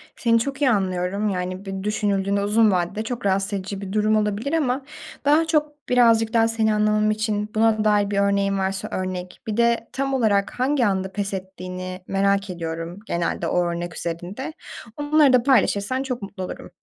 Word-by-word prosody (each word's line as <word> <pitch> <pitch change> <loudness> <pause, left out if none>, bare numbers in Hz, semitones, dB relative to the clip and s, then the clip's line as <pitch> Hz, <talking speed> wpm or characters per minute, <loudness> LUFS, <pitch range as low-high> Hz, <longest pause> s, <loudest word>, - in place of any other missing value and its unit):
Seni 230 -1 +2
çok 275 +4 -4
iyi 275 - +4
anlıyorum. 190 -1 0
Yani, 185 0 -3
bir 195 0 -5
düşünüldüğünde 200 -1 0
uzun 215 +1 +4
vadede 180 +4 -1
çok 240 0 -5
rahatsız 195 +1 +1
edici 195 0 -4
bir 195 -1 -6
durum 215 0 +2
olabilir 215 +6 -1
ama 270 -4 0 0.4
daha 305 +3 +4
çok 300 -2 -1
birazcık 230 -2 +4
daha 225 -1 +4
seni 225 -1 +1
anlamam 210 0 +2
için 215 -1 -1
buna 220 -1 +3
dair 205 -1 +2
bir 200 - +1
örneğin 200 0 +2
varsa 190 0 -2
örnek, 185 -1 -4
bir 215 -1 -2
de 235 -1 +2
tam 275 0 -1
olarak 215 -5 +1
hangi 260 0 +2
anda 190 -2 0
pes 200 0 -3
ettiğini 185 -1 -6
merak 200 0 +1
ediyorum 165 +1 -5
genelde 170 -3 -2
o 180 +2 +1
örnek 170 0 -4
üzerinde. 180 - -5 0.4
Onları 295 -2 +4
da 250 -2 +5
paylaşırsan 255 -1 +2
çok 250 -3 -4
mutlu 195 -1 -6
olurum. - - -7
205 Hz, 175 wpm, -23 LUFS, 190-230 Hz, 0.4 s, da